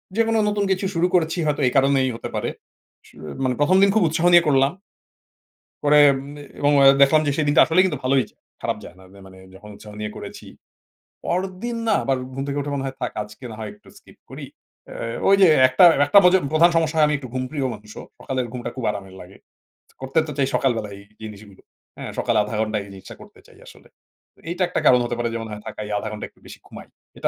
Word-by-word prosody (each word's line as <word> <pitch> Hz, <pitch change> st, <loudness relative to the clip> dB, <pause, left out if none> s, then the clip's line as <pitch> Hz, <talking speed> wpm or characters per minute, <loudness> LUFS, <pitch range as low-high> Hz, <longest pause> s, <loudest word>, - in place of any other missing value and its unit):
যেকোনো 225 Hz, 0 st, +1 dB
নতুন 205 Hz, -1 st, 0 dB
কিছু 190 Hz, +1 st, -1 dB
শুরু 170 Hz, +1 st, +1 dB
করেছি, 165 Hz, -1 st, +1 dB
হয়তো 150 Hz, -1 st, -1 dB
এই -, -, +1 dB
কারণেই 135 Hz, -1 st, +2 dB
হতে -, -, -7 dB
পারে। -, -, -2 dB, 0.6 s
শুয়ে 75 Hz, +1 st, -11 dB
মানে 125 Hz, -1 st, 0 dB
১ম 175 Hz, +6 st, +3 dB
দিন 200 Hz, -, +5 dB
খুব 220 Hz, -, +3 dB
উৎসাহ 165 Hz, +2 st, 0 dB
নিয়ে 175 Hz, 0 st, +6 dB
করলাম। 135 Hz, -1 st, +3 dB, 1.1 s
পরে 150 Hz, 0 st, +4 dB, 0.2 s
উম 140 Hz, +2 st, -9 dB, 0.3 s
এবং 145 Hz, 0 st, +2 dB
এ্যা 135 Hz, 0 st, +7 dB
দেখলাম 155 Hz, +3 st, +5 dB
যে 145 Hz, -, +2 dB
সেদিনটা 145 Hz, -2 st, +3 dB
আসলেই 170 Hz, +4 st, +3 dB
কিন্তু 150 Hz, -8 st, -2 dB
ভালোই 130 Hz, 0 st, +2 dB
যায়, -, -, -33 dB, 0.2 s
খারাপ -, -, -2 dB
যায় 85 Hz, -, -12 dB
না। -, -, -16 dB
মা 95 Hz, -, -18 dB
মা -, -, -15 dB
মানে 95 Hz, 0 st, -16 dB, 0.2 s
যখন 105 Hz, +2 st, -14 dB
উৎসাহ 105 Hz, 0 st, -13 dB
নিয়ে 105 Hz, 0 st, -4 dB
করেছি। -, -, -10 dB, 0.8 s
পরেরদিন 190 Hz, +6 st, -3 dB
না -, -, +3 dB
আবার 135 Hz, -1 st, 0 dB, 0.2 s
ঘুম 135 Hz, -, -4 dB
থেকে 140 Hz, 0 st, -3 dB
উঠে 145 Hz, +1 st, -4 dB
মনে 135 Hz, -1 st, -3 dB
হয়, 135 Hz, -, -6 dB
থাক -, -, -3 dB
আজকে 105 Hz, +4 st, -14 dB
না 110 Hz, -, -9 dB
হয় 110 Hz, -1 st, -6 dB
একটু 105 Hz, -, -22 dB
স্কিপ -, -, -21 dB
করি। -, -, -8 dB, 0.4 s
এ্যা 115 Hz, 0 st, -6 dB
ওই 195 Hz, -, +6 dB
যে 185 Hz, -, +7 dB, 0.2 s
একটা, 130 Hz, +7 st, +4 dB, 0.2 s
একটা 200 Hz, -, +6 dB
মজে 180 Hz, +1 st, +6 dB
প্রধান 165 Hz, +2 st, +5 dB
সমস্যা 160 Hz, -1 st, 0 dB
হয়, 150 Hz, -, +5 dB
আমি 150 Hz, -, 0 dB
একটু 130 Hz, -, -10 dB
ঘুমপ্রিয় 130 Hz, +2 st, -3 dB
মানুষও। 105 Hz, 0 st, -12 dB, 0.2 s
সকালের 130 Hz, -2 st, -3 dB
ঘুমটা 125 Hz, -1 st, -6 dB
খুব 130 Hz, -, -5 dB
আরামের 95 Hz, -2 st, -8 dB
লাগে। 90 Hz, +2 st, -13 dB, 0.7 s
করতে 135 Hz, +4 st, 0 dB
তো 150 Hz, -, -6 dB
চাই 135 Hz, -, +1 dB
সকালবেলাই 110 Hz, -6 st, -1 dB
এই -, -, -15 dB, 0.2 s
জিনিসগুলো। 105 Hz, -2 st, -12 dB, 0.4 s
হ্যাঁ, -, -, -7 dB
সকালে 120 Hz, -3 st, 0 dB
০.৫০ 105 Hz, +1 st, -6 dB
ঘন্টা 110 Hz, -1 st, -2 dB
এই 100 Hz, -, -14 dB
জিনিসটা 95 Hz, -, -12 dB
করতে -, -, -16 dB
চাই -, -, -20 dB
আসলে। -, -, -16 dB, 0.6 s
এইটা 180 Hz, +2 st, -1 dB
একটা 180 Hz, -, -2 dB
কারণ 125 Hz, -, +6 dB
হতে 120 Hz, -, -3 dB
পারে 120 Hz, 0 st, -1 dB
যেমন, 115 Hz, -1 st, -5 dB
হয় 105 Hz, 0 st, -8 dB
থাকাই 105 Hz, -1 st, -7 dB
০.৫০ 105 Hz, -, -5 dB
ঘন্টা 105 Hz, -, -6 dB
একটু -, -, -31 dB
বেশি -, -, -12 dB
ঘুমাই। -, -, -12 dB, 0.3 s
এটা -, -, -1 dB
135 Hz, 220 wpm, -21 LUFS, 110-160 Hz, 1.1 s, এ্যা